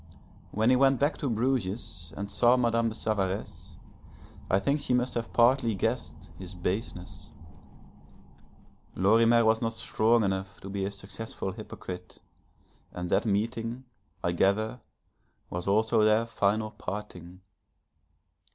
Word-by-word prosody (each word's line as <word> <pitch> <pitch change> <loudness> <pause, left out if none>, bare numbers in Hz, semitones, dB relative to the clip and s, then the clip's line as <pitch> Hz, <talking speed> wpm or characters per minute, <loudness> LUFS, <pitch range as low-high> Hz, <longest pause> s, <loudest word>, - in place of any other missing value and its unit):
When 110 +4 +2
he - - +6
went 135 0 +4
back 145 +3 +1
to 140 - -1
Bruges, 110 -7 -1
and 100 0 -4
saw 120 +1 +4
Madame 115 -1 +2
de 110 - -7
Savaresse, 100 -3 -3 0.7
I 95 - +4
think 140 +9 +1
she 125 - +1
must 125 +1 0
have 115 -1 -3
partly 120 -1 +3
guessed 115 +5 -3
his 95 0 -8
baseness. 90 0 -4 1.7
Lorimer 115 +4 +4
was 110 0 +3
not 115 -1 -1
strong 115 +1 +2
enough 95 0 -2
to 95 - -8
be 100 -1 -2
a 100 - -3
successful 100 0 -6
hypocrite, 90 -3 -8 0.7
and 90 0 -5
that - - +2
meeting, 115 +4 -1 0.4
I 85 - +1
gather, 105 +7 +1 0.7
was 90 +1 -4
also 110 +2 +3
their 110 +2 +4
final 110 -1 0
parting. 90 -3 -7
110 Hz, 130 wpm, -28 LUFS, 95-115 Hz, 1.7 s, he